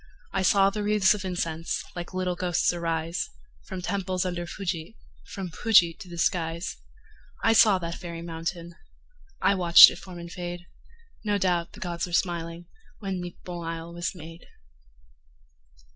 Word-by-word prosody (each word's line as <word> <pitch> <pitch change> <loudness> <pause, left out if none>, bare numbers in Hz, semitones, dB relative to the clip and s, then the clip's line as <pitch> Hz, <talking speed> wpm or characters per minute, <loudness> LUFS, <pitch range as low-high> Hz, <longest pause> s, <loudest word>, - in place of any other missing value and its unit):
I 195 - +1
saw 195 +1 +4
the 210 +1 -3
wreathes 205 -2 +4
of 205 -2 -5
incense 170 -3 -2
Like 175 -1 -6
little 185 -1 -1
ghosts 175 -1 +1
arise, 165 0 -2 0.4
From 185 -1 -6
temples 185 -1 -1
under 175 -1 -3
Fuji, 170 - -5 0.3
From 190 -2 -6
Fuji 180 -5 +4
to 185 - -10
the 170 - -8
skies. 170 0 -1 0.7
I 225 - +5
saw 215 -3 +6
that 170 -2 -4
fairy 170 -1 -7
mountain.... 170 +1 -5 0.7
I - - +5
watched 175 -3 +9
it - - -8
form 185 -2 -10
and 170 0 -8
fade. 175 -1 -6 0.6
No 205 -1 +1
doubt 175 -3 0
the - - -12
gods 175 -1 -3
were 175 - -9
smiling, 170 -1 -1 0.3
When 195 -3 -4
Nippon 175 0 -7
isle 165 0 -5
was 175 +2 -3
made. 165 0 -11
175 Hz, 155 wpm, -26 LUFS, 170-185 Hz, 0.7 s, watched